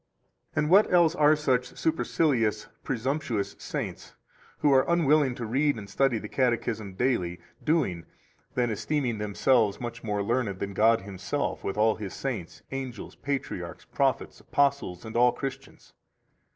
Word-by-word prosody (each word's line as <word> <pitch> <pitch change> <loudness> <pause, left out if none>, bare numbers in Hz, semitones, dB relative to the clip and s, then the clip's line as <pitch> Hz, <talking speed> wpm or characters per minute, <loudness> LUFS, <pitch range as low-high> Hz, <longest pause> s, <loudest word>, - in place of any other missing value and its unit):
16 155 - +2
And 150 - -1
what 200 +3 +6
else 170 -2 +5
are 155 -2 +5
such 125 -4 0
supercilious, 130 -9 +1 0.2
presumptuous 130 -3 -2
saints, - - -5 0.4
who 145 - +3
are 130 0 +6
unwilling 150 -6 +3
to 120 - -5
read 140 +6 +1
and 100 -2 -7
study 125 +4 +1
the 105 - -6
Catechism 115 -5 -1
daily, 95 -7 0 0.2
doing 140 - 0 0.5
than 120 -2 +1
esteeming 120 +1 -1
themselves 105 +1 +2
much 120 -1 -6
more 105 -2 -1
learned 115 -3 0
than 100 +1 -4
God 115 +3 +4
Himself 95 -2 -3
with 95 - -3
all 110 +1 +3
His 105 -3 -6
saints, 110 -11 -5
angels, 130 -4 -5
[patriarchs], 140 -2 -4
prophets, - - -1
apostles, 140 -11 0
and 110 - -8
all 125 +1 +5
Christians? 135 +1 -7
125 Hz, 145 wpm, -27 LUFS, 105-140 Hz, 0.5 s, what